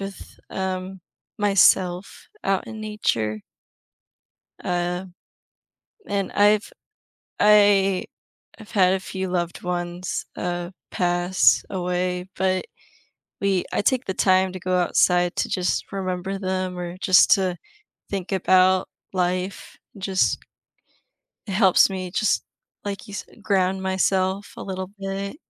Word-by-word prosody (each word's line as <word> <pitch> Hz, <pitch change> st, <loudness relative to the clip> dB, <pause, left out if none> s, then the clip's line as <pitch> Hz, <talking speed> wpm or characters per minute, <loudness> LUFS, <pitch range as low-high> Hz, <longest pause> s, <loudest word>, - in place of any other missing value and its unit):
with, 195 Hz, 0 st, -8 dB
um, 190 Hz, 0 st, -4 dB, 0.4 s
myself 190 Hz, -2 st, +2 dB, 0.2 s
out 195 Hz, -1 st, 0 dB
in 220 Hz, -1 st, -8 dB
nature. 115 Hz, -, -1 dB, 1.2 s
Uh, 180 Hz, +1 st, -1 dB, 1.0 s
and 200 Hz, -1 st, -2 dB
I've 205 Hz, +1 st, +3 dB, 0.7 s
I 205 Hz, -2 st, +5 dB, 0.5 s
I've 220 Hz, -2 st, -13 dB
had 190 Hz, -3 st, +4 dB
a 190 Hz, -, -1 dB
few 190 Hz, -1 st, -4 dB
loved 175 Hz, -1 st, -2 dB
ones, 175 Hz, 0 st, -3 dB
uh, 175 Hz, 0 st, -3 dB, 0.2 s
pass 175 Hz, +1 st, +3 dB
away, 180 Hz, 0 st, -2 dB
but 185 Hz, -1 st, +1 dB, 0.8 s
we 195 Hz, -2 st, +1 dB
I -, -, +1 dB
take 255 Hz, +4 st, +1 dB
the 190 Hz, -, -2 dB
time 185 Hz, 0 st, +3 dB
to 185 Hz, -, -6 dB
go 185 Hz, +1 st, 0 dB
outside 180 Hz, 0 st, +2 dB
to -, -, 0 dB
just 180 Hz, -1 st, -1 dB
remember 190 Hz, 0 st, -3 dB
them 185 Hz, -1 st, -2 dB
or 175 Hz, 0 st, -5 dB
just 185 Hz, -2 st, +5 dB
to 185 Hz, -3 st, +3 dB, 0.5 s
think 195 Hz, -1 st, -4 dB
about 185 Hz, 0 st, +4 dB, 0.2 s
life 185 Hz, +1 st, -2 dB, 0.2 s
and 195 Hz, -, -13 dB
just 190 Hz, -1 st, +1 dB, 1.1 s
it 200 Hz, -, -5 dB
helps 190 Hz, -1 st, +5 dB
me 185 Hz, -2 st, -5 dB
just, 210 Hz, +3 st, +1 dB, 0.4 s
like, 200 Hz, -1 st, -5 dB
you 205 Hz, -, -9 dB
said, 215 Hz, -, -9 dB
ground 190 Hz, -1 st, +1 dB
myself 190 Hz, +1 st, 0 dB
a -, -, -7 dB
little 190 Hz, -1 st, -5 dB
bit, 195 Hz, +4 st, -4 dB
185 Hz, 120 wpm, -23 LUFS, 180-195 Hz, 1.2 s, I